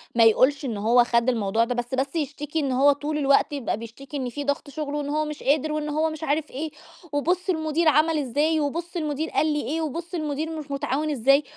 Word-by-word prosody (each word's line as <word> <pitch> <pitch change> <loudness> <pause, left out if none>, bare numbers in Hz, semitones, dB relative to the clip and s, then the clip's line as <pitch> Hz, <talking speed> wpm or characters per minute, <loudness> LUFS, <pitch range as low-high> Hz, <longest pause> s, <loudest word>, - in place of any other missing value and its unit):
ما 230 - +6
يقولش 260 +6 +4
إن 225 -5 -3
هو 235 +4 +4
خَد 235 +1 +2
الموضوع 225 -1 +1
ده، 245 +1 -2
بس 240 +1 -4
بس 270 +4 -2
يشتكي 295 0 -2
إن 275 -3 0
هو 275 +3 +5
طول 295 +2 -2
الوقت 280 0 +3
يبقى 260 -7 -2
بيشتكي 250 +6 -8
إن 255 -2 -2
فيه 285 +4 -5
ضغط 285 0 -2
شُغل، 290 0 -4
وإن 290 -1 -2
هو 305 +1 0
مش 300 -1 -7
قادر، 300 +2 +2
وإن 305 0 -2
هو 310 +2 +1
مش 310 0 -7
عارف 300 0 -1
إيه، 300 +3 -4 0.4
وبُص 350 +6 0
المدير 315 -1 +1
عمل 310 +2 +4
إزاي، 295 +4 +1
وبُص 330 +5 -3
المدير 305 0 -2
قال 310 -1 +1
لي 295 - 0
إيه، 320 +3 -1
وبُص 335 +4 -4
المدير 310 -1 -2
مش 290 -2 -9
مُتعاون 280 +2 -1
إزاي، 275 +2 +4
290 Hz, 225 wpm, -25 LUFS, 265-310 Hz, 0.4 s, ما